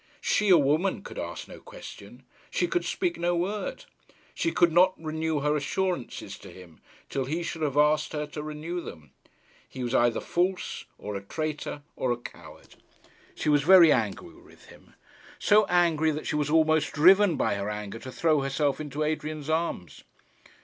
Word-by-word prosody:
She, 210 Hz, -, +1 dB
a 180 Hz, -, +8 dB
woman, 155 Hz, +6 st, +1 dB
could -, -, -8 dB
ask -, -, -6 dB
no -, -, -11 dB
question. -, -, -12 dB, 0.3 s
She 350 Hz, -, 0 dB
could 350 Hz, 0 st, 0 dB
speak 355 Hz, -2 st, -2 dB
no 175 Hz, 0 st, +1 dB
word. 195 Hz, +5 st, -3 dB, 0.5 s
She 335 Hz, -, -1 dB
could 175 Hz, -, +3 dB
not 180 Hz, +3 st, +4 dB
renew 160 Hz, -1 st, -2 dB
her 150 Hz, +1 st, +1 dB
assurances 175 Hz, 0 st, -3 dB
to -, -, -12 dB
him, 90 Hz, -4 st, -14 dB, 0.3 s
till 135 Hz, -1 st, -2 dB
he 160 Hz, +6 st, -2 dB
should 165 Hz, -1 st, -5 dB
have 145 Hz, -2 st, -1 dB
asked 150 Hz, +1 st, +3 dB
her 150 Hz, -1 st, -2 dB
to 150 Hz, 0 st, -7 dB
renew 155 Hz, +4 st, -5 dB
them. 75 Hz, -, -11 dB, 0.6 s
He 130 Hz, -, -6 dB
was 120 Hz, 0 st, -3 dB
either 120 Hz, -2 st, +3 dB
false, 180 Hz, +2 st, -2 dB
or 105 Hz, 0 st, -6 dB
a 100 Hz, -, -4 dB
traitor, 150 Hz, +5 st, -5 dB
or 130 Hz, -, -1 dB
a 120 Hz, -, 0 dB
coward. 120 Hz, -, -13 dB, 0.6 s
She -, -, -4 dB
was 145 Hz, -1 st, +4 dB
very 170 Hz, 0 st, +7 dB
angry 110 Hz, -7 st, -1 dB
with -, -, -19 dB
him; -, -, -18 dB, 0.4 s
so 210 Hz, 0 st, +4 dB
angry 170 Hz, -3 st, +2 dB
that 155 Hz, 0 st, -3 dB
she -, -, -2 dB
was 150 Hz, -1 st, 0 dB
almost 155 Hz, 0 st, +2 dB
driven 185 Hz, +3 st, +5 dB
by -, -, +1 dB
her 100 Hz, +1 st, -3 dB
anger 105 Hz, +1 st, -5 dB
to 130 Hz, -, -9 dB
throw 155 Hz, +1 st, +2 dB
herself 140 Hz, +2 st, -1 dB
into 150 Hz, 0 st, -3 dB
Adrian's 155 Hz, 0 st, -3 dB
arms. 160 Hz, -, -3 dB
155 Hz, 175 wpm, -27 LUFS, 140-175 Hz, 0.6 s, a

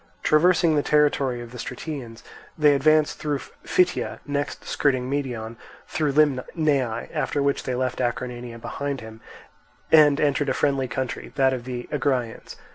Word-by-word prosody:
Traversing 165 Hz, +1 st, +4 dB
the 145 Hz, -, +3 dB
territory 140 Hz, -5 st, +2 dB
of 120 Hz, -1 st, -9 dB
the 125 Hz, -, -9 dB
Stratians, 125 Hz, -3 st, -6 dB, 0.3 s
they 150 Hz, -2 st, +5 dB
advanced 155 Hz, +2 st, +3 dB
through 150 Hz, -2 st, -1 dB, 0.3 s
Phytia, 180 Hz, -1 st, +1 dB
next, 145 Hz, -3 st, -3 dB
skirting 130 Hz, -3 st, 0 dB
Medeon, 120 Hz, -5 st, -3 dB, 0.3 s
through 150 Hz, -3 st, -1 dB
Limnaea; 140 Hz, -4 st, +1 dB
after 145 Hz, -2 st, 0 dB
which 140 Hz, 0 st, +1 dB
they 130 Hz, -, -1 dB
left 130 Hz, 0 st, -2 dB
Acarnania 120 Hz, -1 st, -3 dB
behind 140 Hz, +3 st, -4 dB
them 110 Hz, 0 st, -11 dB, 0.7 s
and 150 Hz, -2 st, +6 dB
entered 145 Hz, -1 st, +1 dB
a 130 Hz, -, 0 dB
friendly 135 Hz, -2 st, +1 dB
country, 125 Hz, 0 st, -4 dB
that 135 Hz, -1 st, +3 dB
of 125 Hz, -2 st, -5 dB
the 125 Hz, -1 st, -5 dB
Agraeans. 130 Hz, -6 st, -2 dB
135 Hz, 145 wpm, -24 LUFS, 125-150 Hz, 0.7 s, and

